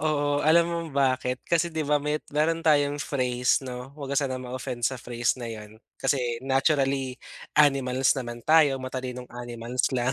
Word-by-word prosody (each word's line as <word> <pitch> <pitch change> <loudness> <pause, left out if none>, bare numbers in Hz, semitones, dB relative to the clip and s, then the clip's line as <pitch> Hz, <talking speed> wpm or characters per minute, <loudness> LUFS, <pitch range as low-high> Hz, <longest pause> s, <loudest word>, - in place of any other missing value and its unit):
oo. 145 -1 +1
Alam 170 +2 +5
mo 170 0 -2
bakit? 130 -2 +1
Kasi 170 0 +2
di 160 - -2
ba 150 +1 +3
may 150 +1 -1
meron 160 +2 +1
tayong 145 -2 +3
phrase 125 -1 0
'no, 125 +1 -7
wag 140 -1 -5
ka - - -1
sanang 130 -2 -3
ma-offend 125 -1 -5
sa 130 - +1
phrase 120 +1 -1
na 120 - -5
yun 110 0 -9 0.2
kasi 135 0 +1 0.2
naturally 135 -1 +1 0.4
animals 135 -3 +4
naman 120 -2 -5
tayo, 155 -4 +5
matalinong 130 -1 -5
animals 120 0 -2
lang. 125 +2 +1
135 Hz, 165 wpm, -26 LUFS, 125-145 Hz, 0.4 s, Alam